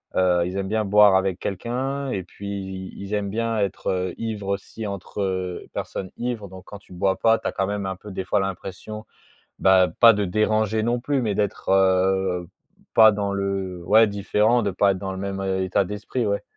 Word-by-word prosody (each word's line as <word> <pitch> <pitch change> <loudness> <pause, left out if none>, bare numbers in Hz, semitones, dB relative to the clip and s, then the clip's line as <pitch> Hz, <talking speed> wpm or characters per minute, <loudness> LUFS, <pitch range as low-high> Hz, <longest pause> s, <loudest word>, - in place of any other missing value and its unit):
Heu, 90 -2 +3
ils 90 +2 -4
aiment 95 0 -2
bien 110 -1 0
boire 105 -1 +6
avec 95 -1 0
quelqu'un 130 +7 -3
et 95 -2 -2
puis 100 +3 -10
ils 95 -1 -6
ils 100 +2 -6
aiment 100 -1 -1
bien 115 +1 -1
être, 100 -2 -2
heu, 90 -1 -2
ivres 110 -3 -4
aussi 100 +2 -4
entre 95 -2 -3
personnes 95 - -5
ivres. 120 -4 -3
Donc 95 0 -12
quand 105 - -10
tu 95 - -17
bois 95 +1 0
pas, 115 0 +4
tu - - -17
as - - -1
quand 95 -1 -1
même 100 -1 -3
un 95 -1 -3
peu 105 - -11
des 95 - -4
fois 90 - +1
l'impression, 95 +3 -5 0.5
bah, 95 -1 +5
pas 115 -1 +9
de 105 -2 -1
déranger 110 +2 +1
non 120 +1 0
plus. 140 0 0
Mais 105 -3 0
d'être, 105 -1 -2
heu, 95 -1 +2 0.5
pas 110 -1 +8
dans 100 -1 -2
le 95 -2 -3
ouais 110 +2 +6
différent, 105 +3 +1
de 100 - 0
pas 100 +2 +3
être 95 - -5
dans 95 0 -4
le 95 - -6
même 100 0 -4 0.2
état 95 +1 +1
d'esprit, 105 +4 -3
ouais. 100 0 -1
100 Hz, 205 wpm, -23 LUFS, 95-110 Hz, 0.5 s, pas